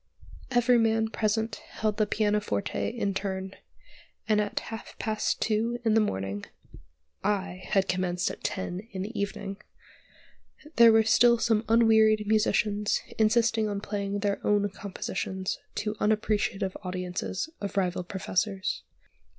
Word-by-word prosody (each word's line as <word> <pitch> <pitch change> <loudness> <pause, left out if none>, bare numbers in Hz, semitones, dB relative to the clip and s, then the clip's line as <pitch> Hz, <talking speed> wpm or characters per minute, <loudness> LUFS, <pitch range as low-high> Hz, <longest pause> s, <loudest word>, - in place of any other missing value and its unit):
Every 245 -1 +4
man 225 -1 +2
present 220 0 -1
held 215 -1 -3
the 215 - +2
pianoforte 205 - 0
in 200 - -2
turn, 190 0 -3 0.7
and 210 -1 +3
at 205 - -2
half 225 - -8
past 215 -1 -1
two 230 +2 0
in 220 - +4
the 225 - +5
morning 100 - -2 0.8
(I 195 -3 -1
had 195 -2 +2
commenced 180 -1 0
at - - -11
ten 180 -1 -3
in 190 -1 -3
the 215 +1 -5
evening), 200 -1 -3 1.2
there 235 -1 +9
were 220 0 +5
still 235 +2 +5
some 225 -1 +2
unwearied 220 -2 +5
musicians 210 -1 +2 0.2
insisting 220 0 +3
on 200 -1 -2
playing 200 -1 -3
their 200 -1 -1
own 205 -1 +2
compositions 190 -1 -4 0.2
to 210 0 -2
unappreciative 210 -2 0
audiences 180 - -3
of 200 0 -4
rival 180 -2 0
professors. 190 +1 -2
210 Hz, 130 wpm, -28 LUFS, 190-220 Hz, 1.2 s, there